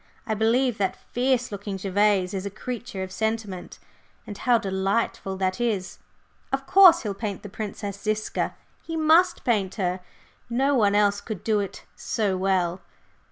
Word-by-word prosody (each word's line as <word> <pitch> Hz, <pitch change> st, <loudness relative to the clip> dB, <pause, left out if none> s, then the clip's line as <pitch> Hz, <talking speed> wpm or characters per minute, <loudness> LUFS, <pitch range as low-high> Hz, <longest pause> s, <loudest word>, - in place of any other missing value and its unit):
I 220 Hz, -, -1 dB
believe 230 Hz, +2 st, +2 dB
that 195 Hz, -2 st, 0 dB, 0.2 s
fierce 250 Hz, -1 st, +1 dB
looking 200 Hz, -1 st, -5 dB
Gervase 195 Hz, -1 st, +2 dB
is 190 Hz, -1 st, -3 dB
a 200 Hz, -, -3 dB
creature 220 Hz, -1 st, -5 dB
of 185 Hz, -, -7 dB
sentiment 220 Hz, -3 st, -3 dB, 0.5 s
and 205 Hz, -, -7 dB
how 240 Hz, +4 st, +3 dB
delightful 195 Hz, -1 st, -1 dB
that 190 Hz, +3 st, -1 dB
is! 210 Hz, -6 st, -1 dB, 0.5 s
Of 270 Hz, 0 st, -1 dB
course, 360 Hz, -1 st, +7 dB
he'll 210 Hz, -3 st, -2 dB
paint 200 Hz, -1 st, -5 dB
the 205 Hz, -, -7 dB
Princess 200 Hz, -1 st, -6 dB
Ziska 215 Hz, 0 st, -1 dB, 0.3 s
he 325 Hz, -1 st, -5 dB
must 320 Hz, +3 st, +4 dB
paint 200 Hz, -6 st, 0 dB
her, 185 Hz, -3 st, -1 dB, 0.5 s
no 265 Hz, +4 st, +2 dB
one 205 Hz, -6 st, +3 dB
else 205 Hz, -1 st, +3 dB
could 215 Hz, -5 st, -6 dB
do 215 Hz, -2 st, +2 dB
it 200 Hz, -2 st, -5 dB
so 205 Hz, -4 st, -1 dB
well. 185 Hz, -1 st, 0 dB
205 Hz, 160 wpm, -25 LUFS, 195-235 Hz, 0.5 s, course